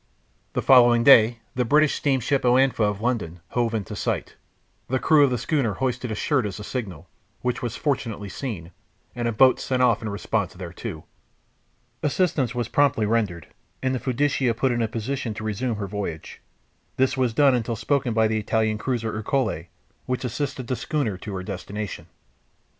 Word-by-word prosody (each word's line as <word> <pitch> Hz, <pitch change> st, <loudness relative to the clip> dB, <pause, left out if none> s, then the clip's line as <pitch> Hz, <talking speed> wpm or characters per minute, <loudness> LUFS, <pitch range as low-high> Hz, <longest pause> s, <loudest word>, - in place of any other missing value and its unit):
The -, -, -1 dB
following 120 Hz, -3 st, +6 dB
day 115 Hz, -3 st, +6 dB
the 125 Hz, -, 0 dB
British 150 Hz, +5 st, +3 dB
steamship 135 Hz, 0 st, +1 dB
Oanfa, 130 Hz, +1 st, +3 dB
of 105 Hz, 0 st, -2 dB
London, 110 Hz, -8 st, -2 dB
hove 120 Hz, -2 st, 0 dB
in 105 Hz, -3 st, -2 dB
sight. -, -, -3 dB, 0.5 s
The 130 Hz, -, 0 dB
crew 150 Hz, +2 st, +5 dB
of 140 Hz, -, +4 dB
the 125 Hz, -, 0 dB
schooner 135 Hz, -6 st, 0 dB
hoisted 125 Hz, -2 st, -2 dB
a 110 Hz, -, -2 dB
shirt 130 Hz, 0 st, +1 dB
as 100 Hz, -, -7 dB
a -, -, -6 dB
signal, 95 Hz, -, -5 dB, 0.4 s
which 125 Hz, -1 st, -1 dB
was 120 Hz, -2 st, -3 dB
fortunately 115 Hz, -8 st, -2 dB
seen, 95 Hz, -, -6 dB, 0.4 s
and 120 Hz, -1 st, -1 dB
a -, -, +1 dB
boat 130 Hz, +4 st, +5 dB
sent 130 Hz, -1 st, 0 dB
off 115 Hz, -3 st, +3 dB
in 110 Hz, -, -4 dB
response 100 Hz, -2 st, -2 dB
thereto. 85 Hz, -3 st, -7 dB, 1.0 s
Assistance 145 Hz, -, 0 dB
was 120 Hz, -2 st, -1 dB
promptly 140 Hz, -6 st, +2 dB
rendered, 105 Hz, -7 st, -1 dB, 0.3 s
and 130 Hz, 0 st, +1 dB
the 130 Hz, -, -1 dB
Fiducia 130 Hz, -2 st, +1 dB
put 130 Hz, +1 st, +2 dB
in 120 Hz, -1 st, 0 dB
a 115 Hz, -, +1 dB
position 115 Hz, +1 st, -3 dB
to 110 Hz, -, -6 dB
resume 110 Hz, +3 st, -2 dB
her 105 Hz, -1 st, -4 dB
voyage. 95 Hz, -5 st, -6 dB, 0.6 s
This 130 Hz, 0 st, +2 dB
was 130 Hz, -3 st, +1 dB
done 135 Hz, +3 st, +4 dB
until 115 Hz, -1 st, -1 dB
spoken 135 Hz, +2 st, 0 dB
by 110 Hz, -1 st, +4 dB
the 110 Hz, 0 st, 0 dB
Italian 110 Hz, 0 st, 0 dB
cruiser 115 Hz, -3 st, -2 dB
Ercole, 110 Hz, -, -1 dB, 0.4 s
which 125 Hz, 0 st, -2 dB
assisted 130 Hz, +1 st, -3 dB
the 130 Hz, -, -2 dB
schooner 140 Hz, -, -2 dB
to 100 Hz, 0 st, -6 dB
her 95 Hz, -, -4 dB
destination. 100 Hz, +2 st, -6 dB
120 Hz, 175 wpm, -24 LUFS, 105-130 Hz, 1.0 s, following